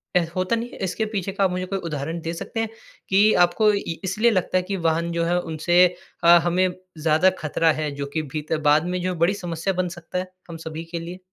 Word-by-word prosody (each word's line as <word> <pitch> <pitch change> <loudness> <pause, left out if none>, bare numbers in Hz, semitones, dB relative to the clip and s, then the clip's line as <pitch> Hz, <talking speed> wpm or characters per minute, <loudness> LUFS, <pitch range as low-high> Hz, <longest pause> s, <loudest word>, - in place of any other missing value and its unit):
अ, - - +7 0.2
होता 185 +5 +1
नहीं 230 +1 -4
है - - -12
इसके 190 +4 -1
पीछे 195 0 -1
का 195 +1 0
आप 190 - +3
मुझे 180 0 -2
कोई 195 +1 -3
उदाहरण 150 +3 -3
दे 165 +1 -3
सकते 200 +6 -5
हैं 225 -1 -1 0.4
कि 205 +3 +5
आपको 210 +4 +3
इ 200 -5 -2
इसलिए 210 +5 +2
लगता 185 -2 +1
है 185 - +1
कि 195 +2 -3
वाहन 165 +1 0
जो 170 0 0
है 175 +1 +2
उनसे 175 +2 +3 0.4
अ, - - +4 0.2
हमें 180 +2 +2 0.3
ज़्यादा 155 +3 +4
खतरा 160 +1 +2
है 155 - -1
जो 140 0 -3
कि 160 - 0
भी 155 - 0
त 160 - +1
बाद 150 +2 +4
में 180 - -1
जो 185 0 -1
बड़ी 180 +4 +4
समस्या 175 -1 -3
बन 180 0 0
सकता 170 +1 -6
है 185 0 -4 0.2
हम 165 - -6
सभी 160 +1 -5
के 170 - -3
लिए? 175 +2 -7
180 Hz, 245 wpm, -23 LUFS, 165-190 Hz, 0.4 s, अ